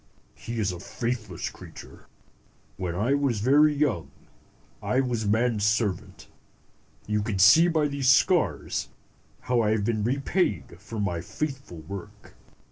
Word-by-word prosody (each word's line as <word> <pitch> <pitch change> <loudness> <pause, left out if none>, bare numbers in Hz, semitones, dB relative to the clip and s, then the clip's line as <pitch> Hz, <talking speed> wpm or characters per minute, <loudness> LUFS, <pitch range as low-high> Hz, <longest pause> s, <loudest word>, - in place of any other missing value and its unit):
He 115 0 -7
is 100 -3 0
a 90 - -7
faithless 110 -3 -4
creature. - - -13 0.7
When 90 -2 -4
I 110 +9 +1
was 140 -6 0
very 145 +7 +5
young, 130 - -1 0.7
I 130 - 0
was 120 -5 -1
man's 110 0 +1
servant. 105 -3 -1 0.8
You 105 0 0
can 105 -2 -3
see 105 - +7
by 160 -3 +1
these 140 -2 0
scars 130 - +2 0.5
how 125 -2 +1
I 105 - +1
have 105 -2 0
been 110 -2 0
repaid 120 - -1
for 105 +2 -7
my 90 -5 -1
faithful 135 - -6
work. 90 +2 -10
110 Hz, 135 wpm, -26 LUFS, 100-135 Hz, 0.8 s, see